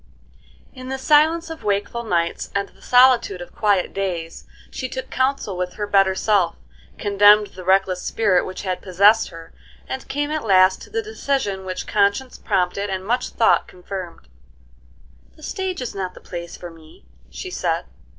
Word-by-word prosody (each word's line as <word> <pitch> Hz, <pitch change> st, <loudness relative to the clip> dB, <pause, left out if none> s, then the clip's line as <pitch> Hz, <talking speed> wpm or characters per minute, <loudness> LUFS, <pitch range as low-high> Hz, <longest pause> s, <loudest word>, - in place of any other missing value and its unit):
In 255 Hz, -1 st, -9 dB
the 265 Hz, -, -2 dB
silence 315 Hz, +4 st, +3 dB
of 325 Hz, -, -9 dB
wakeful 205 Hz, +3 st, -1 dB
nights 170 Hz, -6 st, -1 dB
and 200 Hz, 0 st, -1 dB
the -, -, -24 dB
solitude 245 Hz, -6 st, +4 dB
of 175 Hz, -, -10 dB
quiet 205 Hz, -4 st, +1 dB
days, 175 Hz, -4 st, -4 dB, 0.2 s
she 255 Hz, -, -5 dB
took 260 Hz, 0 st, -6 dB
counsel 260 Hz, -6 st, 0 dB
with 180 Hz, 0 st, -3 dB
her 210 Hz, -, -3 dB
better 195 Hz, -2 st, +3 dB
self, 195 Hz, -4 st, +1 dB, 0.4 s
condemned 205 Hz, 0 st, +5 dB
the 185 Hz, -, -9 dB
reckless 190 Hz, 0 st, +2 dB
spirit 200 Hz, -5 st, +1 dB
which 185 Hz, +1 st, -7 dB
had 185 Hz, -2 st, -3 dB
possessed 200 Hz, +4 st, +4 dB
her, 165 Hz, -1 st, -12 dB, 0.3 s
and 265 Hz, -, -6 dB
came 290 Hz, +1 st, -2 dB
at 310 Hz, -1 st, -2 dB
last 190 Hz, -2 st, +4 dB
to -, -, -11 dB
the 450 Hz, 0 st, -2 dB
decision 270 Hz, -, -2 dB
which 185 Hz, -1 st, -4 dB
conscience 205 Hz, +5 st, 0 dB
prompted 190 Hz, +3 st, -1 dB
and 190 Hz, -1 st, -4 dB
much 245 Hz, +4 st, 0 dB
thought 225 Hz, -, +2 dB
confirmed. 180 Hz, -1 st, -8 dB, 1.1 s
"The -, -, -18 dB
stage 375 Hz, -7 st, -3 dB
is 245 Hz, -, -5 dB
not 185 Hz, -2 st, -5 dB
the -, -, -11 dB
place 170 Hz, -1 st, -8 dB
for 175 Hz, -1 st, -9 dB
me," 160 Hz, -, -18 dB, 0.2 s
she -, -, -7 dB
said. -, -, -1 dB
200 Hz, 170 wpm, -21 LUFS, 185-255 Hz, 1.1 s, condemned